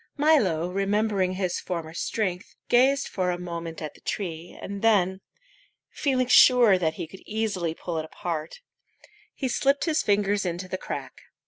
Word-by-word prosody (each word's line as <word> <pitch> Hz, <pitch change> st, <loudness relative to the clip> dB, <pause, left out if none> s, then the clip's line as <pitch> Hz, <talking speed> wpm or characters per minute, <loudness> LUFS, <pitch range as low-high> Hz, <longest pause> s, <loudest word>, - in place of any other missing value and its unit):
Milo, 220 Hz, -, +3 dB
remembering 195 Hz, -1 st, +1 dB
his 185 Hz, -2 st, -2 dB
former 165 Hz, -3 st, -5 dB
strength, 185 Hz, +2 st, -3 dB
gazed 270 Hz, +3 st, +4 dB
for 185 Hz, -2 st, -1 dB
a 175 Hz, -, -1 dB
moment 170 Hz, -2 st, -6 dB
at 150 Hz, -, -5 dB
the -, -, -20 dB
tree, 170 Hz, -3 st, -5 dB
and 200 Hz, 0 st, -6 dB
then, 190 Hz, -4 st, +2 dB, 0.7 s
feeling 260 Hz, -3 st, 0 dB
sure 240 Hz, -5 st, +6 dB
that 160 Hz, -2 st, 0 dB
he -, -, -4 dB
could 190 Hz, +4 st, -13 dB
easily 200 Hz, -7 st, -2 dB
pull 165 Hz, -2 st, -4 dB
it 155 Hz, -, -4 dB
apart, 165 Hz, -, -5 dB, 0.7 s
he 270 Hz, -, -2 dB
slipped 275 Hz, +3 st, +1 dB
his 320 Hz, -2 st, +1 dB
fingers 205 Hz, 0 st, +1 dB
into 180 Hz, 0 st, -3 dB
the 185 Hz, 0 st, -4 dB
crack. -, -, -6 dB
190 Hz, 155 wpm, -26 LUFS, 175-225 Hz, 0.7 s, sure